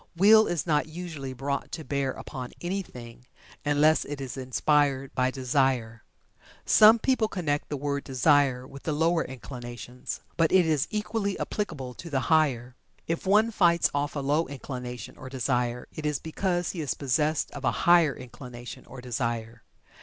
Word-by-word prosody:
Will 215 Hz, +4 st, +7 dB
is 170 Hz, -5 st, -1 dB
not 150 Hz, -2 st, +1 dB
usually 155 Hz, -5 st, -6 dB
brought 140 Hz, +2 st, -3 dB
to 160 Hz, -, -4 dB
bear 140 Hz, -2 st, -1 dB
upon 130 Hz, -1 st, -7 dB
anything 125 Hz, -10 st, -6 dB, 0.4 s
unless 150 Hz, +2 st, +3 dB
it 145 Hz, -1 st, -6 dB
is 130 Hz, -3 st, -5 dB
inspired 135 Hz, +1 st, +1 dB
by 130 Hz, 0 st, +2 dB
Desire. 130 Hz, -3 st, 0 dB, 0.6 s
Some 220 Hz, +2 st, +7 dB
people 235 Hz, -2 st, +1 dB
connect 150 Hz, -8 st, -2 dB
the 145 Hz, -, -2 dB
word 140 Hz, 0 st, -2 dB
Desire 135 Hz, -1 st, +3 dB
with 140 Hz, +1 st, -11 dB
the 155 Hz, -, -2 dB
lower 165 Hz, +2 st, +2 dB
inclinations, 125 Hz, -1 st, -7 dB, 0.2 s
but 165 Hz, -1 st, +3 dB
it 185 Hz, -2 st, +5 dB
is 155 Hz, -4 st, +1 dB
equally 210 Hz, -1 st, -2 dB
applicable 150 Hz, -12 st, -3 dB
to 170 Hz, -, -9 dB
the 135 Hz, -3 st, 0 dB
higher. 130 Hz, -6 st, +2 dB, 0.3 s
If 165 Hz, +3 st, -3 dB
one 215 Hz, +4 st, +4 dB
fights 170 Hz, -5 st, +3 dB
off 145 Hz, +1 st, -1 dB
a 145 Hz, -, -1 dB
low 145 Hz, +4 st, +1 dB
inclination 125 Hz, -4 st, -7 dB
or 130 Hz, -, -8 dB
Desire, 125 Hz, -2 st, -1 dB
it 155 Hz, -, -7 dB
is 150 Hz, -2 st, 0 dB
because 175 Hz, +4 st, -2 dB
he 170 Hz, -, -5 dB
is 145 Hz, -, -2 dB
possessed 150 Hz, +3 st, 0 dB
of 145 Hz, -, -8 dB
a -, -, +3 dB, 0.2 s
higher 170 Hz, -5 st, +5 dB
inclination 125 Hz, -1 st, -10 dB
or 130 Hz, -1 st, -10 dB
Desire. 115 Hz, -1 st, -3 dB
140 Hz, 160 wpm, -27 LUFS, 125-165 Hz, 0.6 s, Will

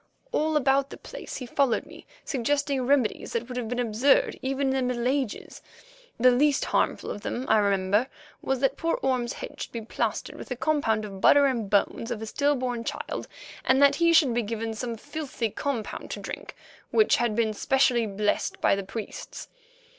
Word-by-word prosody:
All 310 Hz, 0 st, +1 dB
about 275 Hz, 0 st, +2 dB
the -, -, -9 dB
place -, -, -8 dB
he 255 Hz, -, -6 dB
followed 255 Hz, -1 st, +1 dB
me -, -, -14 dB, 0.2 s
suggesting 275 Hz, 0 st, 0 dB
remedies 275 Hz, -5 st, +1 dB
that 235 Hz, 0 st, -2 dB
would 250 Hz, -, -7 dB
have 245 Hz, -2 st, -3 dB
been 245 Hz, -, -2 dB
absurd 245 Hz, +3 st, +3 dB
even 270 Hz, +1 st, 0 dB
in -, -, +1 dB
the 265 Hz, -, +1 dB
Middle 240 Hz, +1 st, -1 dB
Ages. 265 Hz, -4 st, -2 dB, 0.6 s
The 250 Hz, +2 st, +6 dB
least 280 Hz, +3 st, +3 dB
harmful -, -, 0 dB
of 205 Hz, -, -6 dB
them, 250 Hz, +5 st, -3 dB
I 220 Hz, -, +5 dB
remember, 200 Hz, +3 st, +2 dB, 0.3 s
was 265 Hz, -1 st, -1 dB
that 270 Hz, -, +1 dB
poor 330 Hz, 0 st, 0 dB
Orme's 255 Hz, -2 st, 0 dB
head -, -, -8 dB
should -, -, -5 dB
be 230 Hz, -, -5 dB
plastered 215 Hz, -, -3 dB
with -, -, -9 dB
a 250 Hz, -, -2 dB
compound 235 Hz, -7 st, +1 dB
of 195 Hz, -2 st, -9 dB
butter 285 Hz, 0 st, +6 dB
and 250 Hz, -5 st, 0 dB
the 200 Hz, -1 st, +5 dB
bones 230 Hz, -, -8 dB
of 240 Hz, -3 st, -3 dB
a 220 Hz, -, -5 dB
still 285 Hz, +6 st, +1 dB
born 245 Hz, -3 st, -2 dB
child, -, -, -4 dB, 0.4 s
and 260 Hz, +1 st, +3 dB
that 280 Hz, 0 st, +6 dB
he 335 Hz, +1 st, +4 dB
should 315 Hz, -7 st, +5 dB
be 240 Hz, -, +1 dB
given 225 Hz, +1 st, -3 dB
some 230 Hz, +1 st, -4 dB
filthy 260 Hz, -5 st, -4 dB
compound 255 Hz, -5 st, -4 dB
to -, -, -5 dB
drink -, -, -7 dB, 0.3 s
which 435 Hz, -1 st, +4 dB
had 235 Hz, -3 st, 0 dB
been 220 Hz, -1 st, +1 dB
specially 245 Hz, 0 st, +2 dB
blessed 205 Hz, +1 st, -1 dB
by -, -, +3 dB
the 200 Hz, -, -3 dB
priests. 215 Hz, +3 st, -7 dB
250 Hz, 200 wpm, -26 LUFS, 225-275 Hz, 0.6 s, The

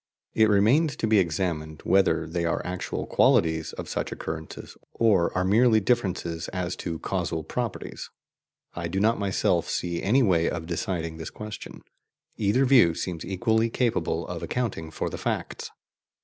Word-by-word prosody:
It 110 Hz, -1 st, +4 dB
remains 120 Hz, +9 st, +3 dB
to -, -, -2 dB
be 110 Hz, -1 st, +4 dB
examined 80 Hz, -3 st, -2 dB
whether 95 Hz, 0 st, +3 dB
they 85 Hz, +1 st, -2 dB
are 85 Hz, -, -1 dB
actual 90 Hz, 0 st, -4 dB
qualities 80 Hz, -1 st, +2 dB
of -, -, -7 dB
such -, -, -3 dB
occurrences, 80 Hz, 0 st, -7 dB, 0.2 s
or 100 Hz, -7 st, +3 dB
are 90 Hz, -, +2 dB
merely 110 Hz, +4 st, +4 dB
differences 95 Hz, -7 st, -1 dB
as 90 Hz, -1 st, -3 dB
to 85 Hz, -1 st, -4 dB
causal 80 Hz, 0 st, -2 dB
properties. -, -, -5 dB, 0.6 s
I 85 Hz, -1 st, -4 dB
do 95 Hz, +3 st, -2 dB
not 110 Hz, +2 st, +2 dB
myself 95 Hz, -4 st, +1 dB
see 85 Hz, -1 st, -2 dB
any 125 Hz, +7 st, +3 dB
way 85 Hz, -6 st, +3 dB
of 80 Hz, -2 st, -4 dB
deciding 85 Hz, -1 st, -3 dB
this 80 Hz, -1 st, -6 dB
question; 105 Hz, -1 st, -9 dB, 0.5 s
either 110 Hz, +6 st, +2 dB
view 120 Hz, -11 st, +5 dB
seems 85 Hz, -2 st, -4 dB
equally 110 Hz, +4 st, +1 dB
capable 115 Hz, -9 st, -1 dB
of 85 Hz, -2 st, -5 dB
accounting 90 Hz, -4 st, -3 dB
for 80 Hz, -, -3 dB
the -, -, -5 dB
facts. -, -, -3 dB
90 Hz, 155 wpm, -26 LUFS, 85-110 Hz, 0.6 s, view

